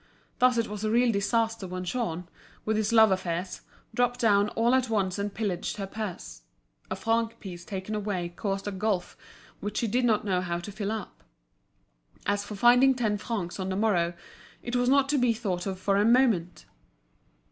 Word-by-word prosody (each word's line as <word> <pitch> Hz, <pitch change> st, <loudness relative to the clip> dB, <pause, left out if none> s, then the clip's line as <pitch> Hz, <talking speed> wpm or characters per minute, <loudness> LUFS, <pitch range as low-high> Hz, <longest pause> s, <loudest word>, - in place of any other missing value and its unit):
Thus 250 Hz, -1 st, +4 dB
it 230 Hz, -1 st, +1 dB
was 210 Hz, 0 st, -6 dB
a 215 Hz, -, +1 dB
real 240 Hz, +2 st, +3 dB
disaster 225 Hz, 0 st, 0 dB
when 185 Hz, 0 st, -5 dB
Jean, 180 Hz, -5 st, -3 dB, 0.4 s
with 220 Hz, -, +1 dB
his 215 Hz, 0 st, 0 dB
love 220 Hz, -2 st, +6 dB
affairs, 180 Hz, 0 st, -2 dB, 0.3 s
dropped 245 Hz, 0 st, +1 dB
down 205 Hz, -2 st, +4 dB
all 235 Hz, +2 st, +3 dB
at 260 Hz, -2 st, +2 dB
once 200 Hz, -3 st, 0 dB
and 205 Hz, 0 st, -2 dB
pillaged 195 Hz, -4 st, -3 dB
her 200 Hz, -, -3 dB
purse. 190 Hz, -, -6 dB, 0.5 s
A -, -, -2 dB
franc 230 Hz, 0 st, 0 dB
piece 175 Hz, -3 st, -8 dB
taken 190 Hz, +2 st, -5 dB
away 200 Hz, -4 st, -2 dB
caused 195 Hz, +3 st, -3 dB
a -, -, -1 dB
gulf 190 Hz, -2 st, -1 dB, 0.4 s
which 205 Hz, +1 st, -4 dB
she 235 Hz, -, +1 dB
did 245 Hz, +4 st, +1 dB
not 220 Hz, -3 st, +2 dB
know 185 Hz, -3 st, +1 dB
how 175 Hz, -1 st, -2 dB
to 175 Hz, +4 st, -7 dB
fill 205 Hz, 0 st, -3 dB
up. 220 Hz, -4 st, -6 dB, 1.0 s
As 205 Hz, 0 st, 0 dB
for 210 Hz, +1 st, -7 dB
finding 245 Hz, +5 st, +5 dB
ten 215 Hz, -4 st, 0 dB
francs 200 Hz, -6 st, -4 dB
on 190 Hz, 0 st, -2 dB
the 190 Hz, -, -1 dB
morrow 180 Hz, -5 st, +1 dB, 0.5 s
it 240 Hz, -, -3 dB
was 245 Hz, 0 st, +2 dB
not 275 Hz, 0 st, +4 dB
to 290 Hz, -1 st, +2 dB
be 245 Hz, -2 st, +3 dB
thought 195 Hz, -5 st, -3 dB
of 190 Hz, -1 st, -4 dB
for 195 Hz, +1 st, +1 dB
a 205 Hz, -, +4 dB
moment. 225 Hz, -7 st, +2 dB
210 Hz, 190 wpm, -28 LUFS, 190-230 Hz, 1.0 s, love